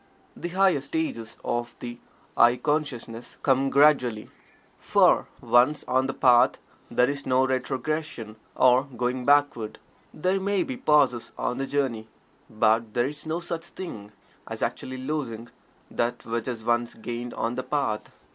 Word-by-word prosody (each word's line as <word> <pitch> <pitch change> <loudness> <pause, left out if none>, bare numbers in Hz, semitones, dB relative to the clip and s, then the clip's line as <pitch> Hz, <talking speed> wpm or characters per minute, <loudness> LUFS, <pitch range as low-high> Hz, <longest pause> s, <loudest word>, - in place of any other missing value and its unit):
The 175 - -5
higher 185 -4 +3
stages 125 -7 -4
of 120 0 -2
the 120 0 -7 0.4
"I" 120 +1 +6
consciousness 125 -4 -3
come 135 0 +3
gradually, 135 -6 +3 0.5
for - - +3
once 130 +5 +3
on 130 +1 +2
the 135 - -3
Path 125 -1 +5 0.3
there 125 - +3
is 140 0 -4
no 130 +1 +3
retrogression 130 -2 -3 0.2
or 130 +1 +5
going 125 -1 -3
backward. 145 -6 +2 0.3
There 185 +4 0
may 200 0 +1
be 265 - -5
pauses 145 - +2
on 125 - -2
the 135 - -2
journey, 130 -6 -1 0.4
but 110 0 +1
there 120 0 +2
is 150 +1 -9
no 165 +2 -2
such 170 -1 -4
thing 105 - -8 0.4
as - - -5
actually 130 0 -3
losing 130 -4 -4 0.4
that 120 +1 -2
which 115 +1 -3
is 115 -3 -5
once 120 0 0
gained 120 +2 -6
on 115 +1 -1
The 130 - -2
Path. 130 -5 -3
130 Hz, 145 wpm, -26 LUFS, 120-145 Hz, 0.5 s, I